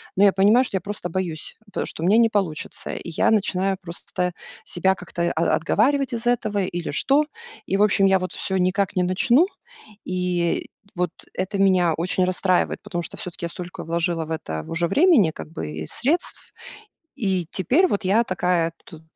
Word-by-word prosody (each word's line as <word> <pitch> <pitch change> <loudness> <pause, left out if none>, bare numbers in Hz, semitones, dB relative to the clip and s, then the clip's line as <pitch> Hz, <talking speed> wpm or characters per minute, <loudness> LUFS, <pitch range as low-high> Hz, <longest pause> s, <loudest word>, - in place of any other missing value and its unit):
Но 195 - +4
я 200 -2 +6
понимаю, 210 +7 +5
что 195 - -2
я - - -4
просто 200 -1 -5
боюсь, 170 -3 -4 0.2
пэ - - -2
что - - -6
у 170 - +1
меня 215 +3 +5
не 230 -1 +5
получится. 190 -8 -2
И 170 - -6
я 165 - +2
начинаю 195 -3 +1
просто 180 0 -4 0.3
себя 190 +2 +1
как-то 170 -2 -3
о 165 - +1
отговаривать 260 - +2
из 230 0 -3
этого 215 -4 +1
или 175 -2 -4
что? 275 - +3 0.4
И, 195 - +1
в 205 - +4
общем, 195 -1 +4
я 195 0 +5
вот 185 0 -4
всё 190 - -2
никак 190 +2 +1
не 180 - +2
начну. 235 - +3 0.6
И 180 -2 -1 0.3
вот 175 -1 -1 0.2
это 190 +2 -3
меня 185 -4 +3
очень 180 +2 +1
расстраивает, 185 0 +1
потому 190 -5 -3
что - - -8
всё-таки 180 -4 -6
я - - -3
столько 180 +1 -7
вложила 170 0 -1
в 160 - -9
это 80 - -4
в - - -11
уже 170 +1 +1
времени, 280 - +4
как - - -9
бы, 80 - -5
и 80 0 -5
средств. 315 +8 -1 0.6
И 190 -5 -1
теперь 255 - +3
вот 200 - -2
я 215 +5 +4
такая 180 -4 0 0.2
вот 160 -1 -11
185 Hz, 190 wpm, -23 LUFS, 170-205 Hz, 0.6 s, я